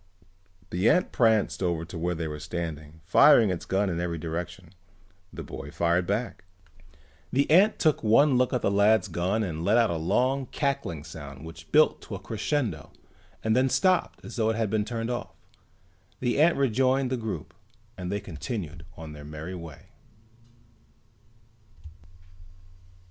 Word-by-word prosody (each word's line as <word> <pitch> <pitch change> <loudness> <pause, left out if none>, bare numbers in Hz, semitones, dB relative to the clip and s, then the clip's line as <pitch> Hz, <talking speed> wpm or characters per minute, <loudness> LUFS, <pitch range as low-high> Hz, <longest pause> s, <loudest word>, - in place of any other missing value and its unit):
The 90 +5 +2
ant 180 - +2
pranced 110 -5 +2
over 85 -3 -1
to 90 - -10
where 85 +1 -1
they 80 0 -3
were 75 -1 -6
standing, 80 -1 -6
firing 115 - +6
its 90 - -4
gun 100 +2 0
in 85 -2 -2
every 85 -1 -2
direction. 85 +2 -6 0.6
The - - -7
boy 70 +2 -8
fired 85 +3 0
back. 105 +2 -2 0.9
The 140 +2 +2
ant 195 +7 +5
took 155 -3 +2
one 130 +6 +5
look 125 0 +2
at 125 - -1
the - - +2
lad's 105 +2 +4
gun 95 +5 -1
and 80 -4 -4
let 105 +6 +3
out 115 -4 +3
a 85 - -1
long 130 +11 0
cackling 135 - -2
sound 70 -3 -10
which 80 - -12
built - - +4
to - - -7
a - - -6
crescendo 110 - -3 0.5
and 110 0 +2
then 130 +1 +3
stopped 185 +5 +1
as - - -8
though 110 -1 +2
it 110 - 0
had 110 -2 -1
been 110 -1 +1
turned 115 +1 -3
off. 120 - -5 0.8
The 125 +3 +1
ant 170 +2 +4
rejoined 130 0 +2
the - - +1
group 100 -9 -5 0.4
and 90 0 -5
they 100 - -1
continued 85 - -6
on 80 -2 -8
their 75 -1 -10
merry 75 +4 -7
way. 85 +1 -10
100 Hz, 160 wpm, -27 LUFS, 80-120 Hz, 0.9 s, firing